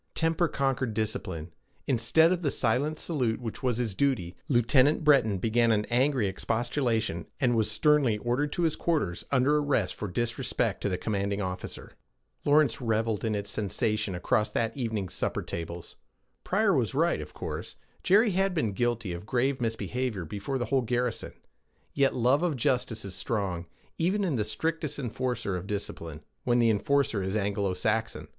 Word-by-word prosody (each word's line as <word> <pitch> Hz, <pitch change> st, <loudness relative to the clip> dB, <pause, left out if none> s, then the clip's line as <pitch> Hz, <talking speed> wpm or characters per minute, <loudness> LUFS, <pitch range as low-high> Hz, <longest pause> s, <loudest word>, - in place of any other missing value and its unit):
Temper 165 Hz, +1 st, +2 dB
conquered 135 Hz, -5 st, -1 dB
discipline. 95 Hz, -7 st, -3 dB, 0.3 s
Instead 135 Hz, +7 st, +4 dB
of 180 Hz, -1 st, 0 dB
the 150 Hz, -, +1 dB
silent 135 Hz, +6 st, 0 dB
salute 125 Hz, -11 st, -1 dB
which 115 Hz, -3 st, -6 dB
was 125 Hz, -3 st, 0 dB
his 120 Hz, -4 st, -1 dB
duty, 105 Hz, -8 st, 0 dB
Lieutenant 130 Hz, +4 st, +4 dB
Breton 135 Hz, -9 st, +4 dB
began 115 Hz, +4 st, +2 dB
an 105 Hz, -1 st, +2 dB
angry 130 Hz, -1 st, +3 dB
expostulation, 115 Hz, -, -1 dB
and 125 Hz, -3 st, +2 dB
was 110 Hz, -2 st, +2 dB
sternly 130 Hz, 0 st, +3 dB
ordered 125 Hz, +7 st, -1 dB
to 175 Hz, -, -1 dB
his 160 Hz, -2 st, +2 dB
quarters, 145 Hz, -, -1 dB
under 140 Hz, +2 st, +3 dB
arrest 145 Hz, -10 st, +1 dB
for 105 Hz, -, -5 dB
disrespect 115 Hz, +5 st, -1 dB
to -, -, 0 dB
the 90 Hz, -, -1 dB
commanding 100 Hz, 0 st, -1 dB
officer. 90 Hz, -2 st, -5 dB, 0.5 s
Lawrence 145 Hz, -6 st, +3 dB
reveled 110 Hz, -2 st, 0 dB
in 110 Hz, -2 st, 0 dB
its 100 Hz, 0 st, -3 dB
sensation 105 Hz, 0 st, -1 dB
across 105 Hz, +4 st, +1 dB
that 115 Hz, -1 st, -1 dB
evening's 110 Hz, -8 st, -3 dB
supper -, -, -2 dB
tables. 85 Hz, 0 st, -6 dB, 0.5 s
Pryor 200 Hz, +1 st, +2 dB
was 130 Hz, -4 st, 0 dB
right, 165 Hz, +4 st, +2 dB
of -, -, -10 dB
course: -, -, -5 dB, 0.3 s
Jerry 210 Hz, +4 st, +4 dB
had 195 Hz, 0 st, +1 dB
been 130 Hz, -10 st, +1 dB
guilty 120 Hz, -4 st, -1 dB
of 85 Hz, +4 st, -8 dB
grave 130 Hz, +2 st, 0 dB
misbehavior 115 Hz, -3 st, -2 dB
before 105 Hz, -, -3 dB
the 120 Hz, -, -1 dB
whole 135 Hz, 0 st, +2 dB
garrison. 120 Hz, 0 st, -2 dB, 0.6 s
Yet 140 Hz, -1 st, +2 dB
love 125 Hz, +5 st, +3 dB
of 175 Hz, -4 st, +1 dB
justice 120 Hz, -3 st, -1 dB
is 95 Hz, -, -6 dB
strong, 95 Hz, -5 st, -2 dB, 0.3 s
even 190 Hz, +5 st, +1 dB
in 170 Hz, -7 st, 0 dB
the 110 Hz, -, +1 dB
strictest 150 Hz, +7 st, -2 dB
enforcer 125 Hz, -5 st, -2 dB
of 90 Hz, +1 st, -5 dB
discipline 85 Hz, -6 st, -5 dB, 0.2 s
when 120 Hz, -1 st, +2 dB
the 115 Hz, -2 st, +4 dB
enforcer 110 Hz, +1 st, +1 dB
is 95 Hz, +3 st, -1 dB
Anglo 100 Hz, -2 st, -1 dB
Saxon. 110 Hz, +4 st, -1 dB
120 Hz, 165 wpm, -28 LUFS, 105-140 Hz, 0.6 s, Instead